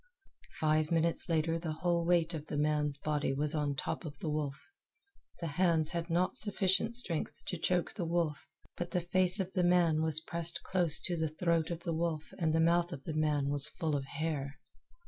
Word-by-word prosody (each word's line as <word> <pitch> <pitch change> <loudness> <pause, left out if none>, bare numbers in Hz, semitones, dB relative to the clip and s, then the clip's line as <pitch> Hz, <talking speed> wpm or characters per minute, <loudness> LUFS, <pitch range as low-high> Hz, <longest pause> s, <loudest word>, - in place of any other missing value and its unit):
Five 155 0 +1
minutes 165 +1 0
later 165 0 0
the 165 -2 -4
whole 170 +1 -1
weight 170 0 +1
of 155 -1 -6
the 150 - -4
man's 150 -1 0
body 150 -1 -2
was 150 +2 +1
on 145 -2 -1
top 135 - -4
of 155 -3 -8
the 165 -7 -4
wolf. 150 - -5 0.7
The 170 - -5
hands 165 0 +1
had 170 0 -4
not 180 +8 +1
sufficient 205 +1 +4
strength 180 -10 -1
to 180 - -4
choke 180 +1 0
the 180 - -4
wolf, 165 -3 -2 0.3
but 175 0 -5
the 180 0 -1
face 185 +2 +3
of 190 -1 -3
the 180 - +1
man 175 -3 +3
was 160 -1 +6
pressed 170 +1 +3
close 175 -5 +1
to 175 - -3
the 160 -1 -1
throat 165 0 0
of 170 -1 -5
the 170 - -2
wolf 160 -1 -3
and 160 -3 +1
the 160 - +1
mouth 170 +2 +2
of 135 -5 -8
the 160 - -5
man 150 -2 0
was 145 0 +1
full 155 -3 -3
of 135 -1 -3
hair. 140 -1 -4
165 Hz, 205 wpm, -32 LUFS, 150-175 Hz, 0.7 s, was